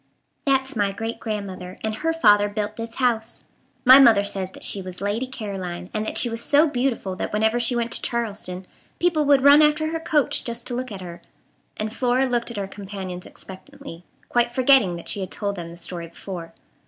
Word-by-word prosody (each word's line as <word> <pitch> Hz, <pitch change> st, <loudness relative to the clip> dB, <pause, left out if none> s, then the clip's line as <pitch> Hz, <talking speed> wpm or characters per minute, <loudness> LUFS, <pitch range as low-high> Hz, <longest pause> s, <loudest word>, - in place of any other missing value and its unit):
"That's 270 Hz, -1 st, +1 dB
my 205 Hz, -2 st, +1 dB
great 225 Hz, +3 st, -5 dB
grandmother; 190 Hz, -4 st, -5 dB
and 220 Hz, 0 st, -1 dB
her 325 Hz, +5 st, 0 dB
father 205 Hz, -10 st, +4 dB
built 210 Hz, 0 st, -3 dB
this 230 Hz, 0 st, -6 dB
house. 235 Hz, -3 st, -1 dB, 0.4 s
My 260 Hz, +2 st, +10 dB
mother 225 Hz, -7 st, +6 dB
says 195 Hz, -2 st, -3 dB
that -, -, -10 dB
she 200 Hz, -, +2 dB
was 185 Hz, -1 st, -8 dB
Lady 205 Hz, +6 st, -2 dB
Caroline, 190 Hz, -7 st, -6 dB
and 215 Hz, -, -1 dB
that -, -, -3 dB
she -, -, +4 dB
was 230 Hz, 0 st, -4 dB
so 295 Hz, +3 st, +4 dB
beautiful 245 Hz, -8 st, -1 dB
that -, -, -3 dB
whenever 220 Hz, +3 st, +1 dB
she 240 Hz, +1 st, +2 dB
went 235 Hz, -1 st, -1 dB
to -, -, -2 dB
Charleston 200 Hz, -6 st, -4 dB, 0.3 s
people 335 Hz, -4 st, +1 dB
would 280 Hz, -2 st, +4 dB
run 285 Hz, +2 st, +8 dB
after 305 Hz, +1 st, +3 dB
her 325 Hz, -, -2 dB
coach 310 Hz, -3 st, 0 dB
just 235 Hz, 0 st, -5 dB
to 245 Hz, -, -4 dB
look 255 Hz, 0 st, -4 dB
at 195 Hz, -2 st, -7 dB
her," 170 Hz, -1 st, -9 dB, 0.6 s
and 215 Hz, +1 st, -3 dB
Flora 255 Hz, +1 st, +2 dB
looked 240 Hz, -2 st, -1 dB
at 235 Hz, -, -7 dB
her 200 Hz, -1 st, -3 dB
companions 190 Hz, -2 st, -7 dB
expectantly, 180 Hz, -2 st, -12 dB, 0.2 s
quite 240 Hz, 0 st, +1 dB
forgetting 250 Hz, -7 st, +4 dB
that 170 Hz, -, -9 dB
she -, -, -1 dB
had 190 Hz, -, -4 dB
told 200 Hz, -1 st, -3 dB
them 170 Hz, -3 st, -7 dB
the 170 Hz, -, -11 dB
story 170 Hz, -1 st, -5 dB
before. 170 Hz, 0 st, -8 dB
220 Hz, 205 wpm, -23 LUFS, 195-255 Hz, 0.6 s, My